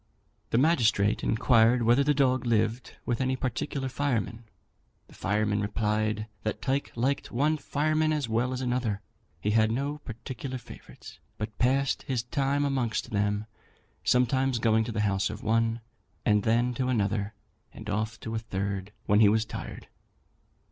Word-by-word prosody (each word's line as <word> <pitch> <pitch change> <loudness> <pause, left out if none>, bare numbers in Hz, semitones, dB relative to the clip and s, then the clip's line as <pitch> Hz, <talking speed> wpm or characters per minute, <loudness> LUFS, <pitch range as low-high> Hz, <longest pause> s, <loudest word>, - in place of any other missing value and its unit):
The - - +1
magistrate 115 -8 +3
inquired 115 +1 +4
whether 120 +5 +4
the 150 +1 +2
dog 130 -2 +2
lived 115 +1 0
with 120 +1 -1
any 130 0 +1
particular 130 +2 -2
fireman. 120 -4 -2 0.6
The - - -17
fireman 105 +1 0
replied 105 +1 0 0.2
that 110 - -2
Tyke 140 +1 -1
liked 130 +4 -1
one 145 +6 +2
fireman 155 +2 +1
as 150 -5 0
well 115 +3 0
as 130 0 -3
another; 120 -5 -1 0.4
he 105 - 0
had 110 0 +4
no 140 +6 -2
particular 130 0 -6
favourites, 120 - -13 0.2
but 105 0 -5
passed 135 +2 +2
his 125 -4 -2
time 140 +3 0
amongst 130 -5 -1
them, 105 0 0 0.6
sometimes 130 +1 +2
going 110 -1 +3
to 115 - -4
the 110 -1 -1
house 100 -1 +1
of 110 0 -7
one, 115 +1 +1 0.4
and 105 -1 +4
then 120 +3 +2
to 125 +1 -1
another, 105 -3 0 0.4
and 110 - -10
off 110 +1 -2
to 110 - -5
a 115 - 0
third 100 -2 -3
when 105 +1 +4
he 105 -2 +7
was 110 +1 +2
tired. - - -7
115 Hz, 155 wpm, -28 LUFS, 110-130 Hz, 0.6 s, he